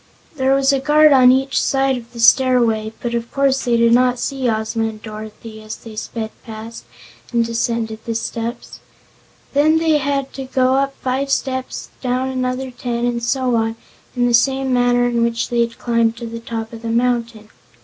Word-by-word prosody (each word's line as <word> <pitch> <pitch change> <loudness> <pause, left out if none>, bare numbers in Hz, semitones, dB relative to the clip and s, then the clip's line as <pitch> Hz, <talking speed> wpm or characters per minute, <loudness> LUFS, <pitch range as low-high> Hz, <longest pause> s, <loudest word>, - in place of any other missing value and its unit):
There 265 -1 +2
was 275 0 +3
a 275 - +2
guard 300 +2 +5
on 255 -2 +7
each 265 +1 +1
side 270 -1 +1
of 240 -1 -9
the 235 - -11
stairway, 230 -3 +4
but 240 -1 -3
of 235 0 -3
course 275 -1 +1
they 240 -1 +2
did 230 0 +4
not 250 0 +3
see 265 -1 -2
Ozma 220 0 -1
and 220 -1 -7
Dorothy 215 0 -9
as 215 0 -7
they 225 -2 -12
sped 220 0 -5
past 220 - -9 0.5
and 235 -1 +2
descended 230 -1 -2
the 230 - -3
steps. 230 +1 -5 0.7
Then 305 +3 +4
they 320 -2 +2
had 275 -1 -2
to 270 - -6
go 260 0 +1
up 275 0 0
five 265 +2 -1
steps 260 -1 -2
and - - -33
down 255 +1 -1
another 255 0 -2
ten, 240 -1 -3
and 240 -1 -1
so 255 +1 0
on, 225 0 0 0.4
in 245 -1 +2
the 240 - +1
same 265 +2 +2
manner 245 0 +3
in 240 -1 0
which 235 0 0
they 240 - 0
had 230 0 -2
climbed 230 -1 +1
to 235 - -6
the 230 0 -6
top 225 0 -6
of 225 - -9
the 230 - -4
mountain. 235 -2 -1
240 Hz, 195 wpm, -19 LUFS, 230-265 Hz, 0.7 s, on